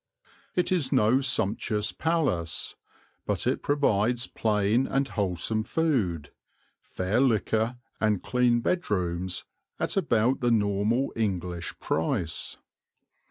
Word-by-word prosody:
It 180 - +1
is 165 -8 +1
no 115 +6 +4
sumptuous 110 -4 0
palace, 145 - -1 0.5
but - - -1
it - - 0
provides 125 -4 +1
plain 110 +2 +1
and 135 0 0
wholesome 100 +1 -1
food, 110 - 0 0.5
fair 95 +7 -1
liquor, 115 -1 +1 0.2
and 105 -3 +1
clean 125 -2 +2
bedrooms 90 - -1 0.3
at - - -1
about 130 - +2
the 120 -3 +1
normal 105 +4 +1
English 90 -6 -2
price. 80 +1 -1
110 Hz, 105 wpm, -27 LUFS, 100-130 Hz, 0.5 s, no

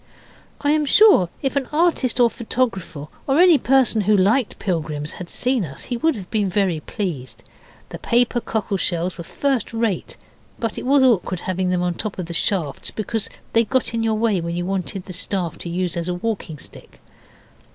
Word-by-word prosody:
I 290 - +2
am 300 -1 +2
sure 400 - +6
if 270 - -1
an 275 -2 0
artist 300 -6 +2
or 245 - +7
a - - +3
photographer, 220 - -3 0.2
or 275 +3 +3
any 350 -4 +7
person 250 -3 +3
who 210 +1 +3
liked 210 +6 +2
pilgrims, 155 -5 -2
had 180 -2 -8
seen 250 -3 +1
us 135 -5 -6
he 245 - -3
would 320 +6 +1
have 195 -4 -7
been 210 -3 +1
very 185 -4 +1
pleased. 130 - -5 0.5
The - - -8
paper 240 0 +1
cockle 215 -3 -2
shells 175 0 -1
were - - -4
first 260 +3 -1
rate, 225 -5 -1 0.4
but 230 -2 -3
it - - -6
was 275 0 +5
awkward 195 -7 +2
having 185 0 -1
them 180 -1 +1
on 175 -1 0
the - - -16
top 215 -2 -3
of 180 - -3
the 170 - -7
staffs, 165 -4 -1
because 220 0 -3 0.2
they 230 - +5
got 250 +2 0
in 230 - 0
your 225 -1 +1
way 215 -4 +1
when 170 +1 -3
you 175 - -2
wanted 190 0 -3
the 185 - -8
staff 180 -2 -2
to 170 - -5
use 175 0 -2
as 170 0 -3
a 180 - -1
walking 185 -5 -3
stick. - - -13
205 Hz, 205 wpm, -21 LUFS, 175-240 Hz, 0.5 s, or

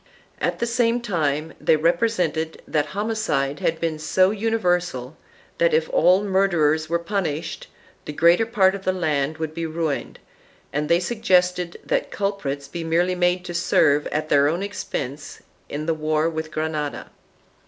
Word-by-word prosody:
At - - -1
the 235 - -1
same 235 0 +1
time 160 -8 -1
they - - +4
represented 165 -1 0
that 150 -2 0
homicide 205 -10 -1
had 165 0 0
been 160 -2 -2
so 185 +5 +3
universal 180 - -1 0.4
that, - - +4
if 475 0 +1
all 200 - +4
murderers 170 -6 +2
were 170 - +2
pun 195 +3 -2
ished, 155 +2 -4 0.4
the - - -5
greater 170 +8 +4
part 195 -5 +3
of 200 -1 -6
the 185 - +1
land 155 -4 -1
would 160 -1 -4
be 165 0 -3
ruined, 160 -3 -3 0.6
and 150 +2 -1
they 170 0 +4
suggested 180 -4 +1
that - - 0
culprits 150 -9 -3
be 165 +4 -6
merely 170 +3 +1
made 180 0 +1
to 175 - -5
serve 150 -4 +3
at 155 +1 -2
their 140 0 +4
own 170 +6 -1
expense 145 -8 -5 0.3
in 150 +1 -4
the 165 - +1
war 155 0 0
with 160 0 -4
Granada. 155 -1 -3
170 Hz, 160 wpm, -23 LUFS, 155-195 Hz, 0.6 s, they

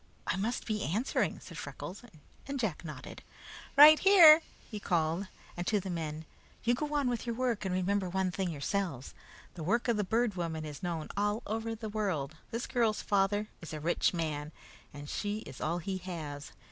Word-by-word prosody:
"I - - 0
must 215 +6 -2
be 215 -2 -2
answering," 220 - 0
said - - -9
Freckles, 185 - -7 0.5
and 280 -1 -3
Jack 205 -11 -2
nodded. 150 -5 -8 0.6
"Right 300 +2 +10
here!" 340 -5 +9 0.3
he 215 - -6
called, 170 0 0 0.3
and 175 0 -4
to 210 - +2
the 190 -1 -5
men: 160 -2 -4 0.4
"You 240 - +3
go 295 +4 -2
on 285 -3 +2
with 240 -1 -2
your 235 - -1
work, 240 -4 -1
and 185 -1 0
remember 185 +1 0
one 190 0 0
thing 180 +1 -2
yourselves. 165 - -3 0.4
The 170 - -8
work 225 +11 +1
of 235 -3 +2
the 210 - +1
Bird 225 +3 +1
Woman 165 -3 -3
is 150 -2 -7
known 170 -3 -3
all 205 +2 0
over 225 +1 -3
the 220 0 -6
world. 185 -9 -2
This 230 +2 -3
girl's 230 -4 +1
father 205 +1 +1
is 165 - -8
a 155 - -4
rich 165 +3 +1
man, 155 -3 -3 0.4
and 145 0 -9
she 205 +6 -3
is 130 - -10
all 165 +3 0
he 190 +2 -3
has. 155 -6 -6
195 Hz, 190 wpm, -31 LUFS, 165-225 Hz, 0.6 s, Right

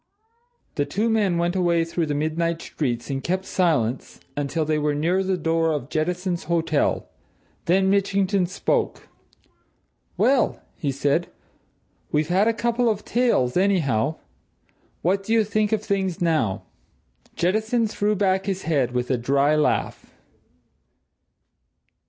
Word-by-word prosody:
The 145 - +1
two 220 +4 0
men 205 -6 +2
went 170 +1 0
away 170 -3 +2
through 165 -1 -2
the 145 - -1
midnight 165 +3 -1
streets, 125 -5 -3
and 135 0 -3
kept 185 +2 -1
silence 145 -12 0 0.2
until 145 +3 -1
they 155 0 0
were 150 0 0
near 170 +6 +1
the 190 -1 0
door 165 -1 +1
of 145 -3 -3
Jettison's 175 +2 -1
hotel. 165 -2 0 0.6
Then 190 +3 +3
Mitchington 195 -1 +1
spoke. 185 - -2 1.1
"Well!" 260 -2 +2 0.2
he 145 - -2
said. 140 +5 0 0.8
"We've 150 +2 +1
had 190 +4 +3
a - - +4
couple 235 +1 +1
of 210 -2 -2
tales, 235 - +1
anyhow! 160 - +2 0.9
What 190 +3 +2
do 220 +3 -2
you 225 -1 +4
think 215 0 0
of 215 -1 0
things, 190 -4 -1
now?" 155 - 0 0.7
Jettison 220 +6 +1
threw 210 0 0
back 190 -1 +1
his 195 -1 -2
head 135 -7 0
with 125 +1 -1
a 125 - +1
dry 140 +4 +2
laugh. 150 - -1
175 Hz, 135 wpm, -23 LUFS, 150-195 Hz, 1.1 s, a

